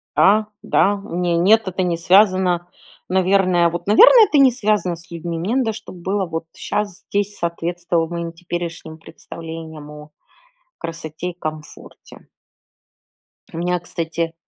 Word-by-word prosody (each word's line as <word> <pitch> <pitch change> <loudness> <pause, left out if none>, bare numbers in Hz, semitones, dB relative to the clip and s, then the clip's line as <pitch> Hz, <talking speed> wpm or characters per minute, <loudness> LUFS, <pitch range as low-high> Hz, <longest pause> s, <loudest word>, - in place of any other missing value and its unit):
Да, 210 +2 +4 0.2
да. 200 0 +2
Не, 175 0 -1
нет, 215 +6 +4
это 185 0 -2
не 170 -2 -1
связано, 185 -1 +3 0.4
наверное, 185 -2 +3
вот, 175 +3 -6
наверное, 455 - +8
это 305 - +1
не 270 -2 +6
связано 210 -7 0
с 170 - -16
людьми. 170 0 -5
Мне 195 +9 -2
надо, 235 -5 +1
чтоб 210 -3 -10
было 190 +3 -2
вот 165 -1 -5
щас 205 -3 -4
здесь 205 0 -1
соответствовало 170 0 -2
моим 170 -1 -4
теперешним 170 -2 -6
представлениям 160 -2 -10
о 150 0 -12 0.7
красоте 165 +1 -6
и 180 - -8
комфорте. 155 -2 -9 1.3
У - - -6
меня, 180 +1 -1
кстати 165 -1 -4
175 Hz, 135 wpm, -20 LUFS, 165-195 Hz, 1.3 s, наверное